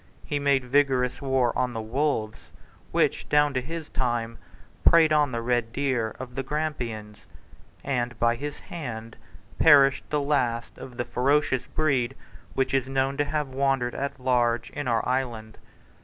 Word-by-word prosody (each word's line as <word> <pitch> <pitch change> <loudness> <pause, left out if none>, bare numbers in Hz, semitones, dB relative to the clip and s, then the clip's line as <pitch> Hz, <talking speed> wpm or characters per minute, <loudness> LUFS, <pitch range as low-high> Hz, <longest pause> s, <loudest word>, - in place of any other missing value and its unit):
He 145 - -2
made 140 -2 +2
vigorous 130 -1 +1
war 130 -3 +1
on 125 -1 0
the 115 - -4
wolves 110 -1 -2 0.4
which, - - +1
down 150 -1 +3
to 130 - 0
his 160 +3 -6
time, 120 -2 -2 0.4
preyed 160 -2 +6
on 150 -3 +3
the 115 -1 -3
red 120 -1 0
deer 125 -4 -1
of 125 -1 -7
the 135 - -2
Grampians; 125 -8 -4 0.6
and 120 -4 -2
by 120 0 +3
his 145 +4 -5
hand 115 -9 -7 0.4
perished 140 -3 +5
the 150 - +1
last 125 -5 -1
of 125 -2 -10
the 120 - -2
ferocious 130 +1 +1
breed 135 -5 0 0.4
which 135 0 0
is 130 -1 +1
known 135 0 0
to 145 - +1
have 150 -2 -2
wandered 135 -2 0
at 140 0 -4
large 120 -2 +1
in 145 - -4
our 115 -2 +1
island. 120 -4 -2
130 Hz, 155 wpm, -26 LUFS, 120-140 Hz, 0.6 s, preyed